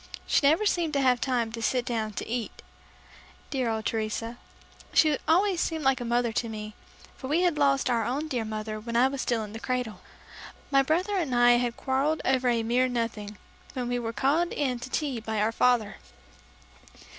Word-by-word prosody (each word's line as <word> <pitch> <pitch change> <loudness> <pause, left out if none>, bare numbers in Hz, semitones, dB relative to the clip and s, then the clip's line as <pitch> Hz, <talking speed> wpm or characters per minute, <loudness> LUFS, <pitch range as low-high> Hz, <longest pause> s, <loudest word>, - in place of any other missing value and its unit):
She - - +3
never 325 +9 +3
seemed 340 -6 +1
to 280 - +2
have 250 -2 +3
time 240 -4 0
to 230 0 -6
sit 245 +2 0
down 220 -3 -2
to - - -5
eat 235 -1 -4 0.9
Dear 260 -4 0
old 220 -1 -2
Teresa! 225 +1 -3 0.6
She 310 -2 +5
always 360 +3 +3
seemed 320 -2 -2
like 270 -1 +2
a - - -3
mother 240 0 +1
to 230 +1 -2
me, 215 -1 -6 0.4
for 260 - -8
we 310 +5 +2
had 345 -4 +1
lost 275 -2 +3
our 235 -2 +1
own 285 +6 -2
dear 250 -6 -2
mother 215 0 -4
when 230 +2 -6
I 245 +2 +5
was 270 0 -3
still 230 -2 0
in 210 0 -9
the 225 - -6
cradle. 250 -3 -3 0.7
My 275 -1 +5
brother 360 +8 0
and 290 -9 -1
I 240 0 +6
had 240 -1 -1
quarrelled 275 +4 0
over 255 -1 +2
a 230 -1 +1
mere 245 +3 +2
nothing, 225 -4 -3 0.4
when 250 -2 -3
we 245 0 -1
were 225 -1 -3
called 280 +10 +1
in 255 -4 -1
to 240 - -7
tea 275 -4 -2
by 220 -1 -3
our 215 +2 +2
father. 235 -2 +2
245 Hz, 200 wpm, -27 LUFS, 225-275 Hz, 0.9 s, I